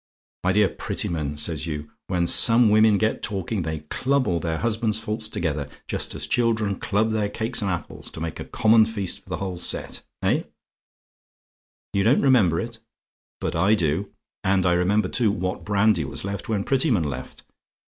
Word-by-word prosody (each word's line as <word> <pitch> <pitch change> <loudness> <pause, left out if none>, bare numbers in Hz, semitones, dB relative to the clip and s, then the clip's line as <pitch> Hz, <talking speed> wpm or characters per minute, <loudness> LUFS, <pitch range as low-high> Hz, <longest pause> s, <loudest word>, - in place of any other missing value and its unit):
'My 90 +1 +2
dear 105 0 +4
Prettyman,' 75 -4 -3
says 80 +1 -3
you, 75 -1 -5 0.2
'when 90 -2 0
some 115 +4 +6
women 110 -1 +5
get 110 +2 0
talking, 100 0 -2
they 80 -2 -4
club 135 0 +1
all 85 -5 0
their 80 0 -2
husbands' 110 0 0
faults 110 0 -4
together; 75 -8 -2 0.2
just - - -2
as - - -5
children 110 -5 0
club 110 +2 +1
their 105 -2 0
cakes 115 +3 -1
and 100 - -1
apples, 90 -1 -4
to - - -8
make 80 0 -4
a - - -5
common 110 0 +4
feast 105 -5 -3
for - - -20
the - - -2
whole 95 -2 -4
set.' 85 - -2 0.2
Eh? - - +2 1.5
"YOU 100 - +2
DON'T 120 +7 +4
REMEMBER 110 -12 +4
IT? 115 0 -7 0.6
"But - - -3
I 95 +6 +4
do: 85 +1 0 0.3
and 95 -1 +2
I 90 - +4
remember, 95 +3 +2
too, 110 +1 +1
what 95 -1 -3
brandy 100 -4 +2
was 70 - -5
left 100 0 -5
when 105 -3 0
Prettyman 130 - +2
left. 65 -4 -6
100 Hz, 175 wpm, -24 LUFS, 85-110 Hz, 1.5 s, some